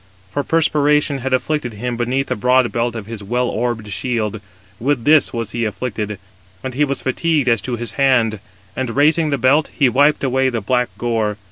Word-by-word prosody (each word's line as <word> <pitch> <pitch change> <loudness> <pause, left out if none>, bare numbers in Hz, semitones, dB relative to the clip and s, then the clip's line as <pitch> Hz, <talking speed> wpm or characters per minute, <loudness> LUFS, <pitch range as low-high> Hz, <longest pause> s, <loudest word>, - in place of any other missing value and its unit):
For 145 - -1
perspiration 150 -2 +2
had 135 +1 -3
afflicted 130 -1 -1
him 120 +3 -4
beneath 125 +3 -1
the - - -2
broad 125 +2 +2
belt 120 0 -1
of 110 -3 -5
his 110 -1 -7
well 120 +5 -1
orbed 115 -2 -2
shield: 105 +1 -2 0.4
with 130 0 0
this 155 0 +5
was 115 -3 -4
he 120 - -2
afflicted, 105 -1 -3 0.5
and 130 - -4
he 145 +4 +1
was 140 -2 -2
fatigued 150 +1 0
as 115 -4 +3
to 125 +2 -3
his 120 0 -4
hand; 120 -6 +2 0.4
and 125 -3 -3
raising 155 +3 +3
the 140 - 0
belt, 140 +5 +3
he 135 -3 +2
wiped 145 +5 +3
away 130 0 +2
the 120 -2 -2
black 125 +4 0
gore. 110 -3 -1
125 Hz, 195 wpm, -19 LUFS, 115-140 Hz, 0.5 s, this